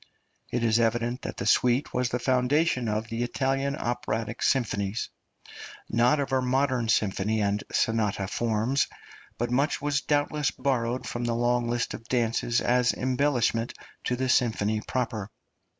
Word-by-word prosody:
It 120 -1 -1
is 115 0 +3
evident 120 +2 0
that - - -6
the 100 - -3
suite 125 +5 +2
was 125 -1 +1
the 125 - -1
foundation 130 +1 +1
of 110 +1 -2
the 115 0 -3
Italian 135 +3 0
operatic 115 -3 -3
symphonies 105 -4 0 0.8
not 120 +6 +3
of 135 -1 -2
our 130 - +3
modern 130 -2 +1
symphony 105 0 +1
and 105 0 0
sonata 105 -4 0
forms 115 +5 0 0.5
but 120 0 -2
much 140 +5 +1
was 145 0 0
doubtless 145 0 +1
borrowed 125 -2 -1
from 120 0 -3
the 120 -1 0
long 120 0 +1
list 120 0 -1
of 115 - -8
dances 120 -1 +1
as 125 0 +3
embellishment 125 -3 0 0.3
to 125 - +1
the 130 +1 -1
symphony 110 -4 +1
proper. 115 -5 -2
120 Hz, 150 wpm, -27 LUFS, 115-130 Hz, 0.8 s, is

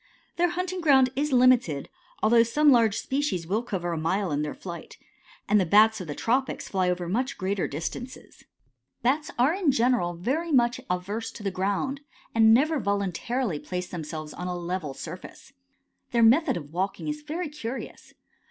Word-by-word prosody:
Their 350 +1 +3
hunting 365 +1 -3
ground 265 -5 +5
is 290 +2 -1
limited, 245 - +3 0.4
although 230 +2 +6
some 290 +6 +4
large 230 -4 +4
species 265 - -2
will 205 +7 0
cover 185 -7 -3
a 165 - -2
mile 185 +3 0
in 145 0 0
their 150 -1 -3
flight, 170 -2 -9 0.5
and 210 0 +4
the - - +3
Bats 215 +3 +5
of 180 - -7
the 145 - -5
tropics 255 +3 -1
fly 185 -2 0
over 180 -1 -2
much 245 +9 -1
greater 190 0 -1
distances. 165 - -7 0.6
Bats 285 +5 +1
are 255 +6 +3
in 360 -6 +2
general 235 -8 +1
very 290 - -2
much 240 -3 +3
averse 195 +5 -3
to 210 - -10
the 195 - -1
ground, 200 +9 -2 0.3
and 225 -1 +6
never 295 +6 +4
voluntarily 200 - -1
place 180 +2 -5
themselves 155 -2 -6
on 180 - -6
a 180 -1 -3
level 175 -5 -4
surface. - - -10 0.6
Their 235 -1 +2
method 250 - +4
of 150 -2 -9
walking 190 - -2
is 300 0 -3
very 320 +3 -4
curious. 265 -4 -7
220 Hz, 170 wpm, -26 LUFS, 180-265 Hz, 0.6 s, although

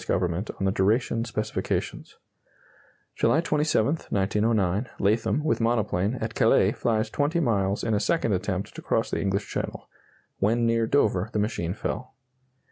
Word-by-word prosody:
Government 90 +2 -1
on 95 - 0
the 95 - +2
duration 115 +4 +1
specifications. 110 -2 -3 1.0
July 155 - +3
27, 150 -3 +1
1909 105 +1 +1
Latham, 110 +8 +1
with 155 - +1
monoplane, 110 -2 +1
at 110 -2 -4
Calais, - - +4
flies 110 -1 -1
20 150 +4 0
miles 100 -8 0
in 115 - 0
a 105 - +2
second 115 +1 +1
attempt 95 +1 -2
to - - -8
cross - - 0
the - - -1
English 100 +1 -1
Channel. - - -5 0.5
When 115 +4 +2
near 115 -1 +2
Dover 105 -7 +2
the - - 0
machine 105 -4 -1
fell. 125 +3 -5
110 Hz, 145 wpm, -26 LUFS, 100-120 Hz, 1.0 s, Calais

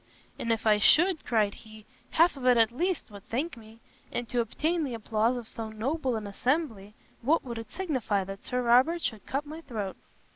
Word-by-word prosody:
"And 230 - -1
if 225 -1 -1
I 210 -1 +5
should," 345 - +5
cried 215 -4 +1
he, 215 -1 -13 0.2
"half 335 +1 +4
of 270 - -9
it, 250 -1 +6
at 225 0 +4
least, 340 - -2
would 200 -1 -12
thank 275 +8 -2
me; 225 0 -15 0.3
and 240 - -3
to 245 - 0
obtain 315 +9 -1
the 260 -5 -3
applause 225 +2 +1
of 235 -2 -6
so 225 -1 -4
noble 255 +4 -1
an 215 -1 -4
assembly, 220 -2 -1 0.3
what 295 +8 +2
would 235 -3 -5
it 225 - -9
signify 255 - -1
that 195 +1 -8
Sir 250 0 -1
Robert 255 +9 +4
should 220 -5 -3
cut 275 +3 -2
my 310 +3 -8
throat?" 215 - -5
235 Hz, 205 wpm, -29 LUFS, 220-290 Hz, 0.3 s, it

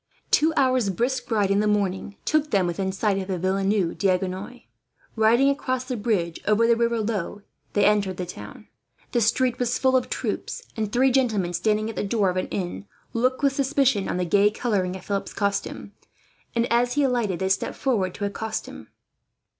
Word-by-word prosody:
Two 315 +2 +4
hours' 255 -6 +3
brisk 245 +6 -1
ride, 205 -4 +1
in 200 - +3
the 210 - +2
morning, 200 -1 -1
took 310 -1 +1
them 195 -7 +2
within 190 +2 -2
sight 195 0 0
of 190 -1 -3
Villeneuve 195 0 0
D'Agenois. 190 +4 -1 0.5
Riding 230 +4 +4
across 255 -2 -2
the 255 -1 -4
bridge 205 -7 -1
over 215 +2 +4
the 235 0 +4
river 235 0 +1
Lot, 205 -2 -3 0.3
he 205 - +4
entered 200 -3 +2
the 180 - -3
town. 175 - -10 0.4
The 240 - +1
street 245 +3 +1
was 245 -1 0
full 260 -1 +2
of 255 - +1
troops; - - -3
and 215 -3 -2
three 260 +3 +3
gentlemen, 220 -9 +1
standing 215 +5 +1
at 225 - -5
the - - -2
door 200 -2 +1
of 180 - -5
an 185 - -1
inn, 175 - -4 0.3
looked 255 +4 0
with 275 -1 +3
suspicion 270 -6 +1
on - - -1
the 180 - 0
gay 200 +4 +4
colouring 200 -5 -1
of 190 - -10
Philip's 200 -1 -3
costume 200 -1 -2 0.6
and, 235 0 +2
as 245 +1 +2
he 290 - +2
alighted, 240 -8 +1
they 190 +1 -1
stepped 195 0 0
forward 200 -9 0
to 205 - -3
accost 220 +2 -3
him. - - -11
210 Hz, 190 wpm, -24 LUFS, 190-245 Hz, 0.6 s, Two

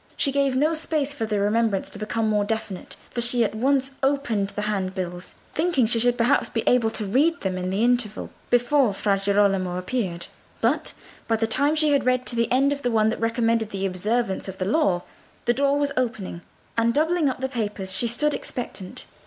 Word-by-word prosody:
She 275 - +2
gave 275 -1 +1
no 300 +5 +2
space 310 -3 -1
for 225 -6 -3
the 210 -2 0
remembrance 210 0 +1
to 205 - -7
become 220 +1 -1
more 210 -1 +2
definite, 205 -3 -4 0.2
for 240 - -2
she 240 0 +3
at 215 - -1
once 270 +4 +1
opened 265 -8 0
the 210 - -4
handbills, 185 -3 -3 0.2
thinking 315 -6 +2
she 230 +1 +3
should 245 +1 +3
perhaps 245 +5 +2
be 225 - -2
able 240 -3 +3
to 220 -1 -2
read 290 - +2
them 190 -2 -1
in 185 0 -3
the 195 +4 0
interval 240 -3 0 0.2
before 245 -2 +3
Fra 200 -1 +1
Girolamo 195 -3 +2
appeared. 185 -4 -2 0.3
But - - +1 0.3
by 225 - +2
the 225 0 0
time 285 +7 +2
she 310 -1 +2
had 280 - +3
read 255 0 +2
to 240 - 0
the 230 0 0
end 275 +3 +3
of 285 - -6
the 245 - 0
one 220 -2 +3
that - - -4
recommended 230 -1 +1
the 195 -2 -3
observance 195 +3 -1
of 190 0 -7
the 185 - -2
law, 195 - +1 0.4
the 240 - +3
door 280 +2 +2
was 285 -1 0
opening, 220 -8 -2 0.3
and 230 0 +2
doubling 320 0 +2
up 255 - -4
the 265 - -1
papers 210 -6 -2
she 235 - +2
stood 295 +6 +1
expectant. 205 -6 -6
230 Hz, 205 wpm, -24 LUFS, 200-265 Hz, 0.4 s, she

